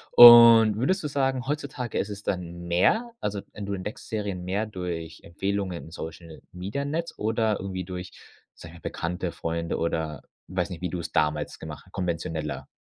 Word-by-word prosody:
Und 115 -3 +10
würdest 185 - +1
du 150 - -2
sagen, 135 -2 0
heutzutage 140 -5 -3
ist - - -1
es 100 0 -7
dann 85 -2 -3
mehr 220 - +2
also 100 -1 -3
en 105 - -7
du 100 - -3
entdeckst 100 +2 -6
Serien 100 -5 -3
mehr 100 +4 -1
durch 85 -5 -5
Empfehlungen 95 0 -3
in 80 - -12
Social-Media-Netz 90 - -5
oder 110 0 0
irgendwie 95 -1 -4
durch, 90 0 -7 0.4
sage 85 - -12
ich 85 - -13
mal, - - -4
Bekannte, 90 +1 -3
Freunde 85 0 -3
oder, 80 -2 -2 0.3
weiß 90 0 -2
nicht, 90 -1 -7
wie 90 - -2
du 90 - -4
es 80 -1 -7
damals 75 -1 0
gemacht 80 -1 -8
h - - -20
konventioneller? 80 -4 -3
95 Hz, 175 wpm, -26 LUFS, 85-110 Hz, 0.4 s, Und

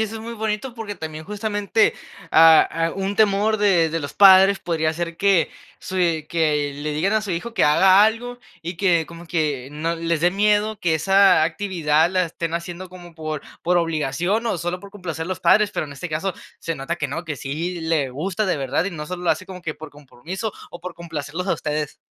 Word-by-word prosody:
eso 220 0 -2
es 225 - -6
muy 230 +1 -6
bonito, 220 +2 -3
porque 220 -3 -6
también 155 -3 -7
justamente, 210 +1 0 0.4
ah 160 0 +7
ah, 165 0 -1
un 195 +1 -2
temor 215 +1 +2
de 180 -6 +3
de 165 +1 -2
los 145 - -6
padres 195 0 +7
podría 160 -2 -1
ser 170 0 -4
que 195 -4 +3 0.3
su 185 0 -5
eh, 165 -4 +1
que 150 -3 0
le 150 +1 -4
digan 170 +8 0
a 220 - +2
su 210 -2 -6
hijo 180 +7 -3
que - - 0
haga 190 +6 +6
algo 235 +3 0 0.2
y 175 +2 -5
que 175 -5 +3
como 170 +1 -11
que 150 -6 -1
no 160 +3 -2
les 165 -1 -1
de 175 - +4
miedo 210 +2 +1
que 165 -2 +1
esa 195 +2 +4
actividad 165 -3 +1
la 185 -1 +2
estén 165 0 -4
haciendo 175 +2 -5
como 175 -2 -13
por 155 -2 -5 0.2
por 175 +1 +2
obligación 165 - 0
o 225 - 0
solo 175 +2 -3
por 200 - -12
complacer 170 -5 -5
a - - -7
los 185 - -4
padres, 205 +4 +4
pero - - -2
en 145 - -9
este 160 +6 -6
caso 160 +5 -2 0.3
se 165 - -3
nota 140 +5 -4
que 155 - -2
no, 165 +6 -5
que 150 -3 -4
sí 165 +7 -4
le 160 -4 0
gusta 180 +11 -2
de 185 - +1
verdad 140 +6 -1
y - - -2
no 155 -4 -6
solo 180 +3 -6
lo - - +3
hace 185 - -1
como 185 -1 -9
que 165 -3 -4
por 155 - -10
compromiso 155 - -7 0.2
o 175 - -10
por 180 0 -7
complacerlos 165 +1 -5
a - - +2
ustedes. 150 -1 -3
175 Hz, 225 wpm, -22 LUFS, 160-195 Hz, 0.4 s, ah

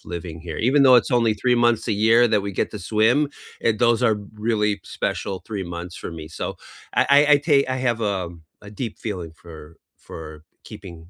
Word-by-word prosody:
living 85 -2 -7
here 80 - -5
even 140 +1 +4
though 130 -2 +7
it's - - -7
only 115 -2 +2
3 125 +4 +1
months 120 -2 +2
a 110 - +1
year 115 +2 +6
that 105 -2 +1
we 100 - -3
get - - -1
to 105 - -7
swim, 110 +5 +3 0.5
and 115 - +3
those 120 0 +3
are 110 - +2 0.3
really 105 -2 +2
special 95 - -3
3 100 -3 -4
months 85 +1 -7
for - - -6
me, 80 - -8
so, - - -2 0.6
I - - +5
I - - +8
I - - +6
ta 150 - +5 0.2
I - - -3
have, 115 -1 -2 0.2
um, 85 -3 -7 0.3
a - - -15
deep 115 -4 -4
feeling 90 -7 -4
for 85 -2 -11 0.5
for 75 -1 -10 0.3
keeping 90 -3 -10
105 Hz, 205 wpm, -22 LUFS, 85-115 Hz, 0.6 s, I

